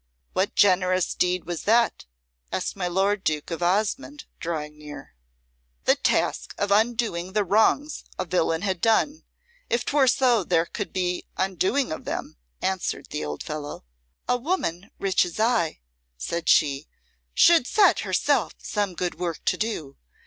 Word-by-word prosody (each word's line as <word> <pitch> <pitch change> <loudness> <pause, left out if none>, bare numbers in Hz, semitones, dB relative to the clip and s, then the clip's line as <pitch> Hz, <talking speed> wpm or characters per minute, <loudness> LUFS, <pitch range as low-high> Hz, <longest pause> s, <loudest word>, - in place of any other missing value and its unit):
"What 190 +2 0
generous 185 -2 +3
deed 180 0 0
was 175 -1 -4
that?" 230 - +2 0.5
asked - - -2
my 185 -2 -2
lord 195 +3 +1
Duke 155 +1 -1
of 165 - -4
Osmonde, 215 +11 0
drawing 150 -3 -4
near. 145 -2 -10 0.7
"The - - +4
task - - 0
of 200 0 -1
undoing 215 -5 +1
the 210 -1 +2
wrongs 220 - +2
a 185 - -2
villain 165 -1 0
had 190 -4 -1
done, 285 +7 +2 0.4
if 240 0 0
'twere 280 -2 +3
so 245 -4 +3
there 170 -1 +2
could - - -5
be 180 -1 -2
undoing 190 - 0
of 155 - -5
them," - - -5 0.3
answered 190 -1 -2
the - - -3
old 75 0 -5
fellow. 150 - -6 0.4
"A 250 - +2
woman 235 - -2
rich 195 -1 +2
as 175 +3 -6
I," 220 - +1 0.4
said 170 - -3
she, 140 -1 +3 0.5
"should 335 -7 +6
set 420 - +4
herself - - +1
some 205 -4 -2
good 175 -1 -3
work 170 -3 -4
to - - +2
do. 170 -11 -4
185 Hz, 150 wpm, -25 LUFS, 170-225 Hz, 0.7 s, should